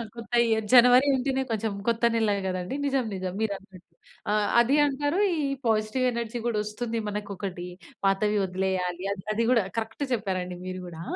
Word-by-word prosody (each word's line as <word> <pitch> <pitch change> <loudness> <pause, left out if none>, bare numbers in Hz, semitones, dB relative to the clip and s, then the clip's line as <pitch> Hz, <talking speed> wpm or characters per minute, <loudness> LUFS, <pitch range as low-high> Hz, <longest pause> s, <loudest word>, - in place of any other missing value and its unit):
కొత్త 235 0 -10 0.2
ఇయర్ 220 -1 +1
జనవరి 250 +2 +7
అంటేనే 265 +1 0
కొంచెం 220 -1 -1 0.2
కొత్త 235 0 0
నెల 220 -2 +2
గదండీ. 185 +4 -3
నిజం! 270 -3 +1
నిజం! 185 -1 -4
మీరు 220 -2 0
అన్నట్టు. 185 -3 -18 0.4
ఆహ్, 210 -1 +2
అదీ 240 +4 +4
అంటారు. 290 +5 0 0.2
ఈ 315 - -2 0.3
పాజిటివ్ 220 +4 +1
ఎనర్జీ 235 0 -3
గూడా 230 -3 0
వస్తుంది. 225 +2 -4
మనకు 210 0 -4
ఒకటి 180 -2 -5 0.4
పాతవి 210 +2 +2
వదిలేయాలి. 185 -1 -2
అది 185 -2 -5
అది 230 +2 0
గూడా 235 -4 +4
కరెక్ట్ 225 +5 -3
చెప్పారండి 185 -5 -2
మీరు 185 0 -5
గూడా! 165 -2 -9
215 Hz, 165 wpm, -26 LUFS, 190-240 Hz, 0.4 s, జనవరి